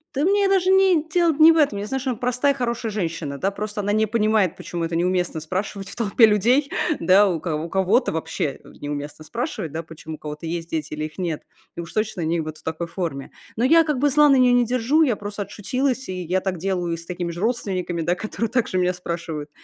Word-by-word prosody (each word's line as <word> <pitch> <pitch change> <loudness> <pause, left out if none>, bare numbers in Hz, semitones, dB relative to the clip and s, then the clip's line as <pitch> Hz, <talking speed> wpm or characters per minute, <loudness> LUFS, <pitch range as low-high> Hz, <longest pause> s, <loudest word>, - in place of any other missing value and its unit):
Да 280 - +1
мне 400 +3 +3
даже 380 -1 +2
ни 380 -5 +4
дело 340 -1 +3
не 315 +2 +7
в 330 - +2
этом. 280 -10 +3
Я 205 - -4
знаю, 265 +3 -2
что 260 0 -3
она- 230 - -5
простая, 250 +3 +1
хорошая 235 -3 -2
женщина, 165 -8 -3
да, 195 +7 0
просто 210 +1 -4
она 205 - -1
не 215 +1 +3
понимает, 215 -4 +1
почему 170 -1 -4
это 165 0 -3
неуместно 175 -1 0
спрашивать 195 +4 -4
в - - -8
толпе 225 0 +5
людей, 235 +7 +3 0.3
да. 200 +2 +5
У 170 -4 -1
кого 160 -2 -2
у - - -7
кого-то 195 +6 +2
вообще, 160 -3 -3
э, - - -15
неуместно 145 +1 -6
спрашивать, 220 - -4
да, 165 +1 -3
почему 160 0 -9
у - - -14
кого-то 150 +1 -7
есть 165 0 -4
дети 155 -2 -3
или 155 0 -4
их 155 - -10
нет. 170 -5 -2 0.3
И 170 - -4
уж 170 - -9
точно 215 -4 -2
не 165 +1 0
вот 155 -1 -5
в - - -23
такой 160 +1 -3
форме. 165 -7 -4 0.3
Но 235 - +2
я 330 +4 +6
как 300 -5 -1
бы 290 +1 +3
зла 295 +2 +5
на 275 - +6
нее 250 -1 +5
не 245 -1 +4
держу. 255 +6 +2
Я 245 -8 +1
просто 205 0 -6
отшутилась, 255 +6 -2
и 185 -1 -4
я 180 +3 0
так 185 -3 -3
делаю 180 -2 -1
с 165 - -11
такими 175 -1 -4
же 170 +2 -7
родственниками, 190 -7 -1
да, 170 +2 +1
которые 215 +3 -3
также 235 -6 0
меня 180 0 +2
спрашивают. 170 -4 -5
195 Hz, 240 wpm, -23 LUFS, 170-245 Hz, 0.3 s, не